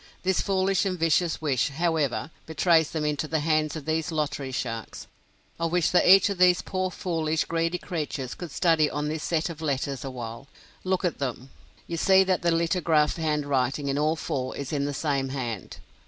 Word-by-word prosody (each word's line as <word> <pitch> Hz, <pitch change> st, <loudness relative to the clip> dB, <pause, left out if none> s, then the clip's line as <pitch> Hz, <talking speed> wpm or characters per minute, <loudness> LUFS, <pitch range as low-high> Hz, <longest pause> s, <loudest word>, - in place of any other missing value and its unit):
This 190 Hz, 0 st, +2 dB
foolish 190 Hz, -1 st, +1 dB
and 190 Hz, -2 st, -1 dB
vicious 165 Hz, 0 st, +1 dB
wish, 135 Hz, -4 st, +1 dB
however, 160 Hz, -1 st, -1 dB, 0.2 s
betrays 160 Hz, 0 st, +3 dB
them 155 Hz, -2 st, -2 dB
into 150 Hz, +1 st, -1 dB
the 160 Hz, 0 st, -1 dB
hands 155 Hz, 0 st, +1 dB
of 155 Hz, -3 st, -6 dB
these 160 Hz, +1 st, -1 dB
lottery 145 Hz, -3 st, -2 dB
sharks. 115 Hz, -4 st, -5 dB, 0.5 s
I 165 Hz, -, +1 dB
wish 175 Hz, -1 st, +1 dB
that 180 Hz, -, +4 dB
each 195 Hz, +2 st, +8 dB
of 190 Hz, -, -5 dB
these 180 Hz, -1 st, +5 dB
poor 185 Hz, 0 st, -2 dB
foolish, 160 Hz, -3 st, -1 dB
greedy 165 Hz, +1 st, -1 dB
creatures 150 Hz, -8 st, -4 dB
could 175 Hz, -, -7 dB
study 155 Hz, -1 st, +2 dB
on 150 Hz, 0 st, -2 dB
this 155 Hz, 0 st, -3 dB
set 160 Hz, -2 st, 0 dB
of 160 Hz, -1 st, -10 dB
letters 140 Hz, -3 st, -2 dB
awhile. 125 Hz, -1 st, -7 dB, 0.4 s
Look 185 Hz, 0 st, 0 dB
at 175 Hz, -, -1 dB
them. 130 Hz, -1 st, -4 dB, 0.3 s
You 170 Hz, -, -4 dB
see 190 Hz, +3 st, +5 dB
that 185 Hz, -1 st, 0 dB
the 175 Hz, -, +2 dB
lithographed 165 Hz, -2 st, +2 dB
handwriting 145 Hz, -3 st, 0 dB
in 140 Hz, +1 st, 0 dB
all 155 Hz, +2 st, +2 dB
four 130 Hz, -5 st, -3 dB
is 140 Hz, +1 st, -5 dB
in 140 Hz, -1 st, 0 dB
the 145 Hz, -, -2 dB
same 140 Hz, -3 st, -1 dB
hand. 120 Hz, -7 st, -5 dB
155 Hz, 185 wpm, -26 LUFS, 140-170 Hz, 0.5 s, each